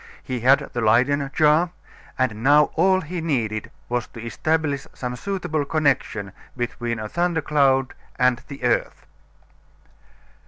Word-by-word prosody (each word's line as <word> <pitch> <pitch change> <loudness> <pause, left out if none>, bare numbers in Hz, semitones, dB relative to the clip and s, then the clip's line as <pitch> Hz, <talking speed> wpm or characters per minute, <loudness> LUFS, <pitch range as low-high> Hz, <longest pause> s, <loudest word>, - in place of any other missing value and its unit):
He 130 -2 -3
had 130 +4 +4
the 120 - -2
Leyden 130 +6 +3
jar, 155 +4 +3 0.5
and 115 -5 -1
now 145 +2 +5
all 185 +3 +3
he 175 +1 -5
needed 115 -9 -1 0.2
was 120 -1 -2
to - - -12
establish 145 +3 -1
some 125 -1 -4
suitable 175 -3 -2
connection 140 -9 0 0.3
between 120 -1 -3
a 110 -1 -5
thunder 170 +4 0
cloud 135 -3 +2 0.2
and 125 -1 +2
the 140 -3 -9
earth. 120 -1 0
135 Hz, 130 wpm, -23 LUFS, 120-155 Hz, 0.5 s, now